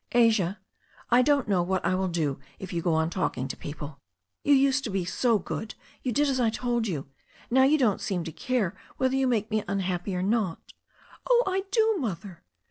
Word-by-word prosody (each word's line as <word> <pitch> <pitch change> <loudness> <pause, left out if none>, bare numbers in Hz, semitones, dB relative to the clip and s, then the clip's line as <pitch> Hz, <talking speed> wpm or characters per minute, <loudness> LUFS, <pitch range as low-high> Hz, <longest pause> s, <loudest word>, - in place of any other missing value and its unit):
"Asia, 220 -6 +3 0.5
I 245 +1 +6
don't 280 -1 +2
know 195 -4 +2
what 185 +1 -1
I - - +2
will 190 +1 0
do 155 -6 -1 0.2
if 190 -1 -8
you 170 - -1
go 165 -1 +1
on 160 +1 +1
talking 135 -9 -1
to - - -5
people. 145 -1 -8 0.4
You 285 - +5
used 270 0 +3
to - - -2
be 190 -3 -1
so 230 +5 +2
good. 215 +3 -5 0.3
You 255 - -1
did 290 +6 +2
as 265 -2 0
I 235 -2 +3
told 240 0 -1
you. 155 -8 -3 0.5
Now 265 +2 +6
you 300 +3 +4
don't 235 -9 +2
seem 180 -4 -1
to 165 - -5
care 210 -1 -1 0.2
whether 260 0 +1
you 270 -1 +2
make 225 -3 0
me 215 -1 +1
unhappy 185 -1 -2
or 180 - -1
not 200 -4 -1 0.2
*' - - -17
"Oh, - - +5
I 385 0 -1
do. 440 0 +3
Mother." 190 - -5
210 Hz, 215 wpm, -27 LUFS, 180-255 Hz, 0.5 s, I